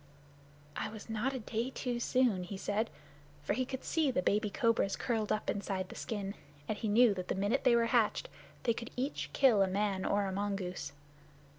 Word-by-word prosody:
"I -, -, -2 dB
was 220 Hz, +1 st, -9 dB
not 225 Hz, +5 st, 0 dB
a -, -, -2 dB
day 230 Hz, +2 st, -2 dB
too 250 Hz, -2 st, -3 dB
soon," 240 Hz, -6 st, +2 dB
he 190 Hz, +2 st, -6 dB
said, 210 Hz, +3 st, -1 dB, 0.5 s
for 200 Hz, -, 0 dB
he 255 Hz, +4 st, 0 dB
could 260 Hz, -1 st, -5 dB
see 315 Hz, -4 st, +1 dB
the 245 Hz, -8 st, 0 dB
baby 210 Hz, +3 st, +2 dB
cobras 230 Hz, -3 st, +2 dB
curled 225 Hz, -4 st, -1 dB
up 215 Hz, -, 0 dB
inside 195 Hz, -2 st, -2 dB
the -, -, -9 dB
skin, 200 Hz, -3 st, -3 dB, 0.3 s
and 215 Hz, -, -1 dB
he 220 Hz, -, -3 dB
knew 225 Hz, +1 st, +6 dB
that 185 Hz, -2 st, -5 dB
the -, -, -1 dB
minute 205 Hz, +8 st, 0 dB
they 245 Hz, -2 st, +6 dB
were 235 Hz, 0 st, +4 dB
hatched 230 Hz, -2 st, +2 dB, 0.4 s
they 235 Hz, -, +3 dB
could 230 Hz, +1 st, -6 dB
each 270 Hz, +4 st, -2 dB
kill 245 Hz, -7 st, +5 dB
a 195 Hz, -, +4 dB
man 195 Hz, 0 st, 0 dB
or 205 Hz, 0 st, +1 dB
a 190 Hz, -, -2 dB
mongoose. 195 Hz, -4 st, -3 dB
215 Hz, 200 wpm, -33 LUFS, 200-240 Hz, 0.5 s, knew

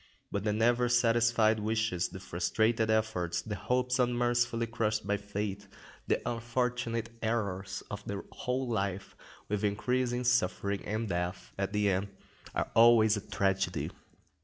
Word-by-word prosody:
But 100 Hz, -, -2 dB
the 105 Hz, -, +2 dB
never 120 Hz, +3 st, +2 dB
satisfied 115 Hz, -2 st, +3 dB
wishes, 110 Hz, -4 st, 0 dB
the 95 Hz, -, -8 dB
frustrated 110 Hz, +6 st, +1 dB
efforts, 110 Hz, -6 st, 0 dB
the 110 Hz, -, -4 dB
hopes 125 Hz, +6 st, 0 dB
unmercifully 120 Hz, -1 st, +1 dB
crushed 110 Hz, -2 st, -1 dB
by 105 Hz, 0 st, +1 dB
fate, 100 Hz, 0 st, -4 dB, 0.4 s
the -, -, 0 dB
unfortunate 115 Hz, -1 st, -1 dB
errors 100 Hz, -5 st, -2 dB
of 105 Hz, 0 st, -5 dB
the 100 Hz, -1 st, -4 dB
whole 130 Hz, +1 st, -2 dB
life, 100 Hz, -4 st, -2 dB, 0.3 s
with 105 Hz, 0 st, -2 dB
increasing 125 Hz, +4 st, 0 dB
suffering 100 Hz, -4 st, +1 dB
and 110 Hz, +2 st, -1 dB
death 90 Hz, 0 st, -3 dB
at 95 Hz, 0 st, -2 dB
the 105 Hz, -1 st, +1 dB
end, 95 Hz, +2 st, 0 dB, 0.5 s
are -, -, -1 dB
always 115 Hz, -1 st, +6 dB
a 105 Hz, -, -3 dB
tragedy. 95 Hz, -2 st, -1 dB
110 Hz, 135 wpm, -31 LUFS, 100-120 Hz, 0.5 s, always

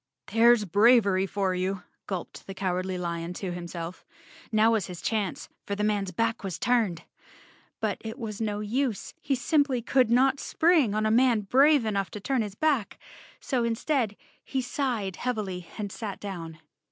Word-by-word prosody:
"There's 230 Hz, -1 st, +5 dB
bravery 200 Hz, -1 st, +4 dB
for 195 Hz, -1 st, 0 dB
you," 185 Hz, +1 st, -2 dB, 0.2 s
gulped 185 Hz, -4 st, -6 dB
the 195 Hz, -, -7 dB
Cowardly 185 Hz, -1 st, -2 dB
Lion 170 Hz, -1 st, -3 dB
to 185 Hz, 0 st, -4 dB
himself. 175 Hz, 0 st, -6 dB, 0.5 s
Now 220 Hz, +1 st, +4 dB
vias 220 Hz, -5 st, +1 dB
his 180 Hz, -2 st, -8 dB
chance, 210 Hz, -2 st, -2 dB, 0.2 s
for 200 Hz, -, -1 dB
the 210 Hz, -, -2 dB
man's 205 Hz, -3 st, 0 dB
back 225 Hz, +5 st, -1 dB
was 190 Hz, -4 st, -4 dB
turned. 220 Hz, -9 st, +1 dB, 0.8 s
But -, -, -1 dB
it 225 Hz, +2 st, -6 dB
was 220 Hz, -4 st, -5 dB
no 210 Hz, -1 st, -1 dB
use; 230 Hz, +1 st, -2 dB
he 275 Hz, -, 0 dB
simply 270 Hz, +1 st, +2 dB
could 255 Hz, -1 st, +3 dB
not 260 Hz, +3 st, +4 dB
spring 315 Hz, -, +3 dB
on 215 Hz, 0 st, +1 dB
a 215 Hz, -, +2 dB
man 240 Hz, -1 st, +4 dB
brave 270 Hz, +5 st, +4 dB
enough 200 Hz, -4 st, -1 dB
to -, -, -6 dB
turn 260 Hz, +4 st, 0 dB
his 205 Hz, -2 st, -5 dB
back, 280 Hz, -6 st, 0 dB, 0.4 s
so 255 Hz, -4 st, -1 dB
instead 235 Hz, -1 st, 0 dB, 0.3 s
he 270 Hz, -, -2 dB
sighed 245 Hz, -7 st, -2 dB
heavily 200 Hz, -8 st, -3 dB
and 205 Hz, -2 st, -4 dB
sat 205 Hz, -2 st, -6 dB
down. 170 Hz, -5 st, -6 dB
215 Hz, 165 wpm, -27 LUFS, 190-245 Hz, 0.8 s, There's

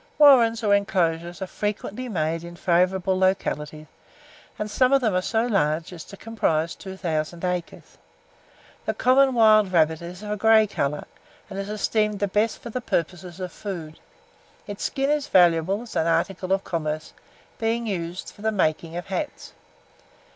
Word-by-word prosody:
Warrens, 240 Hz, -6 st, +6 dB
or 205 Hz, -1 st, +3 dB
inclosures, 175 Hz, -3 st, 0 dB
are -, -, -2 dB
frequently 210 Hz, +5 st, -4 dB
made 165 Hz, -3 st, -1 dB
in 170 Hz, 0 st, -9 dB
favourable 185 Hz, +2 st, +1 dB
localities, 155 Hz, -5 st, -1 dB, 0.7 s
and 210 Hz, -, -3 dB
some 255 Hz, +4 st, +2 dB
of 275 Hz, -, +6 dB
them 220 Hz, -5 st, +1 dB
are 180 Hz, -, +2 dB
so 225 Hz, +4 st, 0 dB
large 165 Hz, -7 st, 0 dB
as 165 Hz, -3 st, -8 dB
to 200 Hz, -, -12 dB
comprise 170 Hz, -8 st, -1 dB
2,000 170 Hz, -3 st, -4 dB
acres. 180 Hz, -1 st, -5 dB, 0.9 s
The -, -, 0 dB
common 265 Hz, +1 st, +4 dB
wild 215 Hz, -4 st, +5 dB
rabbit 160 Hz, -2 st, +2 dB
is 175 Hz, +3 st, -9 dB
of 210 Hz, -, -5 dB
a 210 Hz, -, -1 dB
grey 220 Hz, +1 st, +5 dB
colour, 150 Hz, -7 st, -2 dB, 0.5 s
and 195 Hz, -, -5 dB
is 195 Hz, +1 st, -5 dB
esteemed 210 Hz, 0 st, 0 dB
the 205 Hz, -, +1 dB
best 210 Hz, +3 st, 0 dB
for 235 Hz, -, -7 dB
the 255 Hz, -, -3 dB
purposes 175 Hz, -3 st, -3 dB
of 180 Hz, -1 st, -5 dB
food. 170 Hz, -6 st, -7 dB, 0.7 s
Its 205 Hz, -1 st, -7 dB
skin 275 Hz, 0 st, 0 dB
is 295 Hz, -1 st, 0 dB
valuable 180 Hz, -, +3 dB
as 240 Hz, -, -11 dB
an 160 Hz, -, +1 dB
article 180 Hz, +3 st, 0 dB
of 195 Hz, 0 st, +2 dB
commerce, 155 Hz, -2 st, -3 dB, 0.5 s
being 230 Hz, +1 st, 0 dB
used 180 Hz, -4 st, -4 dB
for -, -, -16 dB
the 220 Hz, +1 st, +1 dB
making 165 Hz, -4 st, -1 dB
of 175 Hz, -, -5 dB
hats. 190 Hz, -2 st, -5 dB
190 Hz, 165 wpm, -24 LUFS, 170-215 Hz, 0.9 s, Warrens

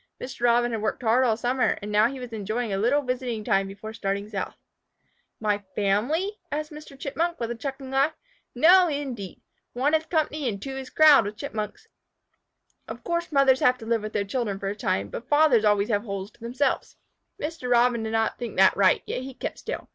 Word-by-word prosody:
Mr. 250 Hz, -1 st, -8 dB
Robin 240 Hz, 0 st, +3 dB
had 225 Hz, -2 st, -2 dB
worked 215 Hz, +3 st, -2 dB
hard 235 Hz, +3 st, +4 dB
all 225 Hz, -4 st, +2 dB
summer, 250 Hz, +2 st, +1 dB
and 210 Hz, 0 st, -6 dB
now 210 Hz, +2 st, +4 dB
he 265 Hz, +2 st, -6 dB
was 250 Hz, -2 st, -8 dB
enjoying 215 Hz, +1 st, -2 dB
a -, -, 0 dB
little 265 Hz, +7 st, +2 dB
visiting 250 Hz, -3 st, -3 dB
time 195 Hz, -1 st, +1 dB
before 205 Hz, +3 st, -8 dB
starting 200 Hz, -2 st, -3 dB
south. 205 Hz, -3 st, -4 dB, 0.8 s
"My 210 Hz, -1 st, 0 dB, 0.2 s
family?" 270 Hz, -, 0 dB
answered 305 Hz, +1 st, -3 dB
Mr. 300 Hz, -2 st, -11 dB
Chipmunk, 335 Hz, +5 st, -2 dB
with 230 Hz, 0 st, -2 dB
a -, -, -3 dB
chuckling 270 Hz, +2 st, -6 dB
laugh. 275 Hz, +4 st, +1 dB, 0.4 s
"No, 355 Hz, +8 st, +6 dB
indeed! 270 Hz, -, -5 dB, 0.3 s
One 270 Hz, +5 st, +1 dB
is 315 Hz, 0 st, +1 dB
company 305 Hz, -4 st, 0 dB
and 200 Hz, -3 st, -4 dB
two 270 Hz, +6 st, -6 dB
is 265 Hz, -1 st, -6 dB
crowd 305 Hz, -7 st, +6 dB
with 210 Hz, +1 st, -6 dB
Chipmunks. 220 Hz, -, -5 dB, 1.0 s
Of -, -, -8 dB
course 340 Hz, 0 st, -2 dB
mothers 275 Hz, -2 st, +4 dB
have 250 Hz, 0 st, +3 dB
to 225 Hz, -, -10 dB
live 230 Hz, -1 st, +1 dB
with 215 Hz, 0 st, -6 dB
their 200 Hz, -, 0 dB
children 205 Hz, -2 st, -2 dB
for 195 Hz, 0 st, -3 dB
a 200 Hz, -, -4 dB
time, 100 Hz, -, -1 dB
but 240 Hz, -, -8 dB
fathers 290 Hz, -7 st, +4 dB
always 205 Hz, +1 st, +3 dB
have 205 Hz, -2 st, +1 dB
holes 200 Hz, -2 st, -6 dB
to -, -, -27 dB
themselves." 245 Hz, +4 st, -2 dB, 0.4 s
Mr. 300 Hz, -4 st, -4 dB
Robin 240 Hz, -1 st, +3 dB
did 220 Hz, -, -3 dB
not 225 Hz, 0 st, 0 dB
think 235 Hz, -4 st, -6 dB
that 190 Hz, 0 st, +6 dB
right, 190 Hz, -2 st, +3 dB
yet -, -, -3 dB
he 260 Hz, 0 st, -8 dB
kept -, -, -5 dB
still. -, -, -6 dB
240 Hz, 210 wpm, -25 LUFS, 210-275 Hz, 1.0 s, No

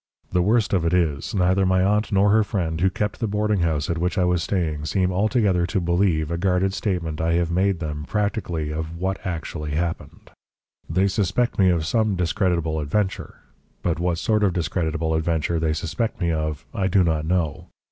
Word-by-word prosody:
The 90 Hz, -, +2 dB
worst 110 Hz, +4 st, +2 dB
of 90 Hz, -4 st, +2 dB
it 85 Hz, +2 st, +2 dB
is, 80 Hz, 0 st, 0 dB
neither 95 Hz, +1 st, +3 dB
my 95 Hz, 0 st, +3 dB
aunt 105 Hz, +3 st, +1 dB
nor 100 Hz, 0 st, +4 dB
her 110 Hz, +1 st, +5 dB
friend 85 Hz, -6 st, -2 dB
who 95 Hz, -, +4 dB
kept 105 Hz, +3 st, -3 dB
the 115 Hz, -, -1 dB
boarding 105 Hz, 0 st, 0 dB
house 80 Hz, -4 st, 0 dB
at 85 Hz, -1 st, -2 dB
which 90 Hz, +4 st, -1 dB
I 90 Hz, -, +3 dB
was 90 Hz, -1 st, +1 dB
staying 80 Hz, -5 st, -1 dB
seem 95 Hz, +2 st, +1 dB
altogether 100 Hz, -2 st, +2 dB
to 100 Hz, -, 0 dB
believe 85 Hz, -3 st, +1 dB
a 85 Hz, -, -2 dB
guarded 95 Hz, +1 st, +1 dB
statement 85 Hz, -7 st, -2 dB
I 85 Hz, +1 st, +1 dB
have 85 Hz, 0 st, +1 dB
made 95 Hz, +2 st, +2 dB
them 75 Hz, -2 st, -4 dB
practically 100 Hz, -7 st, -2 dB
of 80 Hz, +1 st, -4 dB
what 95 Hz, +2 st, -3 dB
actually 80 Hz, -4 st, -4 dB
happened. 85 Hz, +1 st, -4 dB, 0.6 s
They 95 Hz, +4 st, +2 dB
suspect 105 Hz, +5 st, 0 dB
me 95 Hz, -1 st, +5 dB
of 85 Hz, -3 st, +1 dB
some 110 Hz, +2 st, +1 dB
discreditable 85 Hz, -2 st, 0 dB
adventure, 95 Hz, +7 st, -2 dB, 0.4 s
but 85 Hz, -2 st, 0 dB
what 85 Hz, -1 st, 0 dB
sort 105 Hz, +5 st, +1 dB
of 95 Hz, -3 st, +2 dB
discreditable 80 Hz, -2 st, -1 dB
adventure 80 Hz, +1 st, 0 dB
they 80 Hz, -1 st, +1 dB
suspect 85 Hz, +9 st, -3 dB
me 85 Hz, -3 st, +1 dB
of, 75 Hz, -4 st, -3 dB
I 95 Hz, -, 0 dB
do 95 Hz, 0 st, +3 dB
not 80 Hz, -3 st, 0 dB
know. 80 Hz, -3 st, -1 dB
90 Hz, 195 wpm, -23 LUFS, 80-100 Hz, 0.6 s, her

